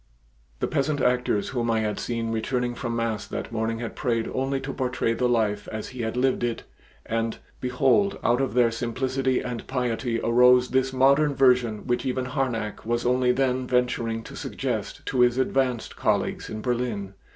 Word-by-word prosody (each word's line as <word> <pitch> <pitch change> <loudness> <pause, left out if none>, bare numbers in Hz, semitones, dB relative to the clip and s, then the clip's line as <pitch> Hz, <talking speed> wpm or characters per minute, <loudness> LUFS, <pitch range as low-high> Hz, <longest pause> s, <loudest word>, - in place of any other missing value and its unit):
The - - +1
peasant 145 +1 0
actors 125 -5 +1
whom 120 -3 -1
I 110 -1 +2
had 105 -2 -2
seen 115 -1 -2
returning 120 +2 -1
from 120 -1 -3
mass 115 -2 -2
that - - -5
morning 115 0 -1
had 115 0 -5
prayed 115 -4 0
only 135 +1 0
to 135 0 -5
portray 125 -3 0
the 125 +1 +1
life 110 -4 +1
as 110 -1 -5
He 130 -1 -6
had 110 +1 -2
lived 130 -1 +1
it 120 -1 -2 0.4
and, 115 0 -1 0.2
behold, 130 +10 +2
out 120 +3 +3
of 130 -3 -2
their 120 -2 +4
simplicity 130 +3 -1
and 120 -2 -5
piety 120 -2 -1
arose 125 +1 +5
this 130 0 +1
modern 140 +3 +4
version 125 -5 +3
which 120 -1 0
even 130 0 -1
Harnack 125 -5 -2
was 120 +2 -1
only 125 0 +3
then 130 0 0
venturing 120 -2 0
to - - -10
suggest - - -4
to 130 - -1
his 125 0 +4
advanced 130 -2 0
colleagues - - 0
in 110 0 -5
Berlin. 120 -6 -2
125 Hz, 175 wpm, -25 LUFS, 115-130 Hz, 0.4 s, arose